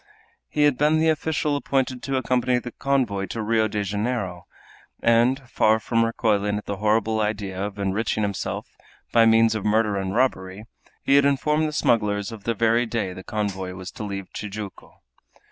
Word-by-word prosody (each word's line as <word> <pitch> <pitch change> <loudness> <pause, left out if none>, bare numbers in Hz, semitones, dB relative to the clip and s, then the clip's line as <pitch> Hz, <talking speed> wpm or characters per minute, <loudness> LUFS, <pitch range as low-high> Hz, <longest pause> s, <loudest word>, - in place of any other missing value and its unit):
He 150 - +1
had 145 -4 +3
been 150 +2 +3
the 160 +1 +3
official 155 -1 0
appointed 135 -3 -1
to 135 -1 -2
accompany 125 -1 +1
the 125 0 -5
convoy 120 -9 0
to 115 - -4
Rio 110 0 +2
de 105 -1 -2
Janeiro, 100 -3 -3 0.5
and, 120 +3 +2
far 110 -1 +3
from 115 +1 +1
recoiling 105 -3 0
at 105 - -7
the 100 - -4
horrible 110 +1 +1
idea 100 -3 -2
of 105 0 -5
enriching 100 +2 -1
himself 100 -2 -4 0.4
by 115 -1 +5
means 115 0 +5
of 110 -3 -3
murder 105 -1 +2
and 95 +1 -3
robbery, 105 -5 -1 0.4
he 140 - +4
had 140 - +5
informed 150 +3 +2
the - - -3
smugglers 105 -7 +1
of 110 -3 -10
the 115 - 0
very 115 +2 +2
day 110 -5 -2
the 95 - -9
convoy 95 -3 -3
was 95 0 -8
to - - -8
leave 100 -2 -6
Tijuco. 105 -1 -8
110 Hz, 180 wpm, -24 LUFS, 100-125 Hz, 0.5 s, by